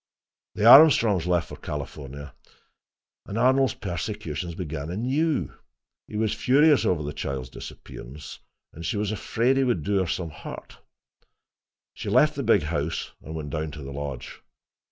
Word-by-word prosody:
The 105 Hz, -, 0 dB
Armstrongs 115 Hz, -, +7 dB
left 90 Hz, -2 st, +1 dB
for -, -, -8 dB
California, 70 Hz, -1 st, -7 dB, 0.9 s
and 100 Hz, -, -5 dB
Arnold's 130 Hz, +2 st, +3 dB
persecutions 85 Hz, -3 st, -4 dB
began 80 Hz, -4 st, -5 dB
anew. 130 Hz, -, 0 dB, 0.5 s
He 105 Hz, -, -6 dB
was 110 Hz, -1 st, +1 dB
furious 145 Hz, +3 st, +4 dB
over 85 Hz, -4 st, +1 dB
the 75 Hz, 0 st, -4 dB
child's 65 Hz, -3 st, -4 dB
disappearance 70 Hz, +5 st, -10 dB, 0.3 s
and 85 Hz, -, -9 dB
she 85 Hz, +5 st, -2 dB
was 105 Hz, 0 st, -1 dB
afraid 120 Hz, +4 st, 0 dB
he 135 Hz, -, +3 dB
would 120 Hz, -, 0 dB
do 100 Hz, +2 st, +1 dB
her 95 Hz, -, 0 dB
some 85 Hz, -1 st, -3 dB
hurt. 80 Hz, -, -10 dB, 1.1 s
She -, -, -6 dB
left 155 Hz, 0 st, +4 dB
the 140 Hz, -, -4 dB
big 100 Hz, -, +3 dB
house 75 Hz, 0 st, -3 dB
and 80 Hz, -, -8 dB
went 75 Hz, -3 st, -5 dB
down 80 Hz, +1 st, -2 dB
to 75 Hz, -1 st, -8 dB
the 70 Hz, 0 st, -7 dB
lodge. 70 Hz, -3 st, -6 dB
90 Hz, 155 wpm, -25 LUFS, 75-115 Hz, 1.1 s, Armstrongs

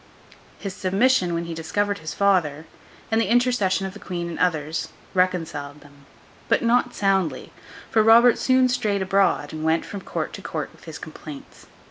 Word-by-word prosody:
His 195 Hz, -2 st, -6 dB
submission 195 Hz, -1 st, +2 dB
when 170 Hz, 0 st, -2 dB
he 170 Hz, -, -5 dB
discovered 200 Hz, +5 st, -1 dB
his 155 Hz, -1 st, -6 dB
father, 170 Hz, -7 st, +1 dB, 0.5 s
and 225 Hz, +1 st, +3 dB
the 205 Hz, -, -1 dB
intercession 235 Hz, -6 st, +2 dB
of 190 Hz, -, -5 dB
the 210 Hz, -, -11 dB
queen 175 Hz, -3 st, -4 dB
and -, -, -7 dB
others, 160 Hz, -2 st, 0 dB, 0.3 s
reconciled 165 Hz, -6 st, -1 dB
them; 145 Hz, -1 st, -19 dB, 0.4 s
but -, -, +2 dB
not 245 Hz, +1 st, +2 dB
soundly; 195 Hz, -4 st, 0 dB, 0.4 s
for 220 Hz, -, +4 dB
Robert 230 Hz, +2 st, +6 dB
soon 260 Hz, -1 st, +4 dB
strayed 210 Hz, -5 st, 0 dB
abroad, 195 Hz, -3 st, +1 dB
and 155 Hz, 0 st, -5 dB
went 160 Hz, +1 st, +1 dB
from 200 Hz, -, -7 dB
court -, -, -4 dB
to -, -, -8 dB
court -, -, -4 dB
with -, -, -19 dB
his 160 Hz, -2 st, -7 dB
complaints. 155 Hz, -2 st, -11 dB
185 Hz, 170 wpm, -23 LUFS, 160-210 Hz, 0.5 s, Robert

